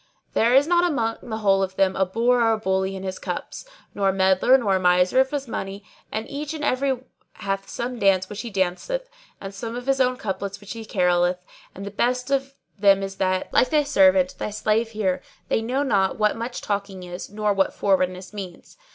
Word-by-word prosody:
There 235 +3 +3
is 275 +2 +6
not 345 +1 +3
among 235 -10 0
the 220 -2 -5
whole 195 -3 +3
of 190 0 -2
them 190 -1 +2
a 190 -1 +1
bore 240 +5 +2
or 225 -1 +4
a - - 0
bully 190 -2 -1
in 190 - -7
his 190 -1 -4
cups; - - -5 0.3
nor 195 -1 +1
a - - +3
meddler 190 +6 +4
nor 200 -7 +1
a - - -2
miser 180 +5 +3
of 265 0 +3
his 280 -2 -3
money, 195 -2 -5 0.3
and 220 +1 -3
each 295 +2 -5
and 305 - -6
every 260 -2 0 0.3
hath 195 0 -4
some 245 0 -4
dance 190 -2 +3
which 210 +1 -6
he 235 - -6
danceth 210 - -2 0.3
and 195 0 -7
some 225 +4 -6
of 245 0 -6
his 270 0 +2
own 255 0 +2
couplets 200 -3 -4
which 205 0 -8
he 225 -1 -8
caroleth; 180 -2 +1 0.3
and 195 - -7
the 200 - -6
best 250 +5 -1
of 275 0 0 0.2
them 195 -1 +5
is 195 0 -6
that, 185 -1 -1
like 255 - +4
thy 300 +1 +3
servant, 280 -1 +4
thy - - -2
slave 215 +2 0
here, 210 -5 -1 0.3
they - - +1
know 255 +5 -1
not 195 -8 +1
what 210 -1 +2
much 235 +2 -5
talking 200 -2 -3
is 180 0 -7
nor 210 0 0
what 195 -1 +1
forwardness 185 -1 0
means. 190 - -9
210 Hz, 215 wpm, -23 LUFS, 190-250 Hz, 0.3 s, is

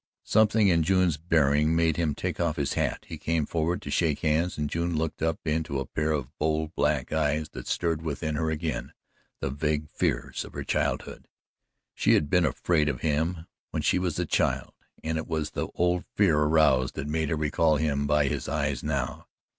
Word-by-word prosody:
Something 110 0 +4
in 85 -3 +4
June's 90 -2 +2
bearing 75 -1 +2
made 80 -1 +2
him 80 -3 0
take - - -3
off 85 -3 +1
his 70 -2 -1
hat; - - -1
he 80 - -7
came 80 0 0
forward 85 +3 -1
to 70 - -5
shake 80 -3 +1
hands, 80 +3 +1
and 75 0 -1
June 85 +2 -1
looked 80 0 -2
up 80 0 +1
into 80 -2 -1
a 65 - -3
pair 75 +5 -1
of 70 -3 -3
bold 80 +1 0
black - - 0
eyes 75 0 0
that - - -9
stirred 80 -2 0
within 80 0 -3
her 80 +1 0
again 80 -3 -3 0.5
the 70 - -1
vague 75 +1 -1
fears - - -1
of - - -12
her - - -4
childhood. - - -2 0.7
She - - +3
had 75 -1 0
been 90 -1 +4
afraid 75 +2 +1
of 65 -4 -4
him 80 +2 0 0.2
when - - -3
she - - +3
was 90 -4 -1
a - - 0
child, - - 0 0.3
and 80 0 -1
it 80 - -6
was 80 -2 -2
the - - -3
old 90 0 +1
fear 95 -7 +4
aroused 75 -4 +3
that 70 - -4
made 80 0 -1
her 80 - +1
recall 75 +1 +2
him 70 -2 0
by 75 0 +3
his 65 - -2
eyes 70 -3 -1
now. 70 -4 -3
80 Hz, 200 wpm, -27 LUFS, 75-80 Hz, 0.7 s, Something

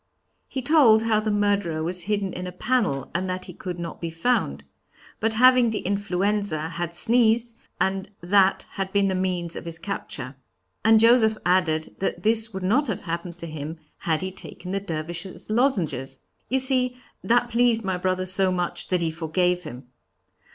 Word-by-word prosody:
"He 265 - -5
told 240 -7 +5
how 220 -2 +2
the 215 0 -2
murderer 205 -6 0
was 175 +2 -1
hidden 200 -2 -1
in 180 0 -5
a - - -5
panel, 200 - -1
and 185 +2 -1
that 185 0 -3
he 180 - -9
could 180 +1 -6
not 170 -1 -7
be 170 - -3
found. 165 - 0 0.6
But 225 +1 0
having 255 0 +6
the 220 - -2
influenza, 200 -4 -1
had 170 0 -4
sneezed, 230 +3 +2 0.2
and 190 +1 -1
that 190 +2 +3
had 195 -1 -4
been 200 -1 +2
the - - 0
means 180 -2 -2
of - - -7
his 165 -1 -4
capture. 140 -9 -6 0.5
And 220 0 +6
Joseph 225 -1 +5
added 175 -3 +1
that 195 - -2
this 220 0 +1
would 190 -2 -6
not 250 +10 +2
have 215 -2 -3
happened 170 0 -5
to 170 - -7
him 155 0 -6 0.2
had 160 0 -1
he 190 - -3
taken 180 0 -9
the 195 - 0
Dervishes 170 +2 -6
Lozenges. 185 - 0 0.3
You 265 - +2
see 255 -1 +3 0.3
that 240 +1 +2
pleased 235 -1 +3
my 190 -2 -1
brother 185 0 -1
so 185 0 +3
much 180 -1 -2
that 180 -2 0
he 165 - 0
forgave 175 +2 0
him. 125 +2 -8
190 Hz, 180 wpm, -24 LUFS, 170-220 Hz, 0.6 s, having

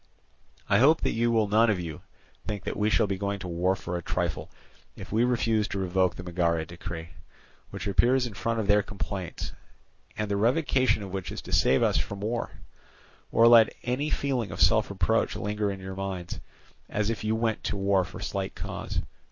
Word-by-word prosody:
I 100 - +4
hope 155 +6 +5
that - - +1
you 120 +1 +1
will 110 -2 +2
none 110 +3 +4
of 100 -4 +1
you 80 -3 -6 0.5
think 105 -3 -3
that - - -3
we 105 0 +1
shall 110 - +3
be 95 -2 -3
going 100 0 -1
to 95 - -7
war 90 +2 +1
for 90 -2 -5
a 85 - -2
trifle 85 -2 -2 0.5
if - - -10
we 110 +3 +3
refuse 115 -3 +1
to 100 - -4
revoke 95 -1 +1
the 90 - -7
Megara 85 -2 0
decree, 85 0 -7 0.6
which - - -6
appears 125 +6 +3
in 120 - -6
front 115 +2 -1
of 110 - -1
their 105 +1 +4
complaints, 95 -3 -5 0.6
and 105 - -1
the 100 0 -1
revocation 130 0 +2
of 95 - -7
which 95 -1 -4
is - - -6
to - - -7
save 65 - +4
us - - +2
from 100 -1 -5
war, 115 +3 -2 0.8
or 115 - +6
let 115 -2 +7
any 130 +5 -1
feeling 130 -8 -1
of - - -7
self - - +4
reproach - - +1
linger 105 0 -1
in 100 -1 -4
your 95 0 -7
minds, 95 -3 -5 0.5
as 105 +1 0
if 115 - -4
you 110 +1 +1
went 110 -1 -1
to - - -1
war 100 -1 +2
for 90 0 -9
slight 100 -1 -3
cause. - - -4
100 Hz, 200 wpm, -27 LUFS, 95-115 Hz, 0.8 s, let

